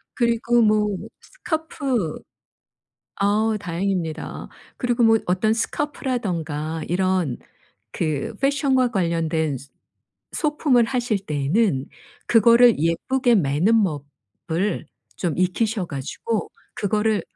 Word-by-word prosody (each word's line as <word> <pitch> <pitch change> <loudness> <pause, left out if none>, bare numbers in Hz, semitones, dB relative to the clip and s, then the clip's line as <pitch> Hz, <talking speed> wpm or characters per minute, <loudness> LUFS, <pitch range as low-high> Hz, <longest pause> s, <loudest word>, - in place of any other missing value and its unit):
그리고 235 0 +2
뭐 210 -2 +2 0.2
스카프 280 - -3 1.0
아. 210 +2 +2
다행입니다. 175 -3 -3 0.3
그리고 245 -1 +1
뭐 225 -1 +5
어떤 185 +5 +2
스카프라든가 180 - -2
이런 180 -6 0 0.6
그 155 +3 -2
fashion과 275 -2 +2
관련된 165 - 0
스 140 +3 -15 0.6
소품을 295 -6 +2
하실 240 -4 0
때에는 150 - +1 0.4
그거를 235 +1 +6
예쁘게 240 - +1
매는 185 +6 +3 0.7
법을 180 +4 -1 0.3
좀 170 -5 -2
익히셔 195 +3 0
가지고 145 +11 -4 0.2
그거를 210 +1 0
210 Hz, 235 characters per minute, -22 LUFS, 165-235 Hz, 1.0 s, 그거를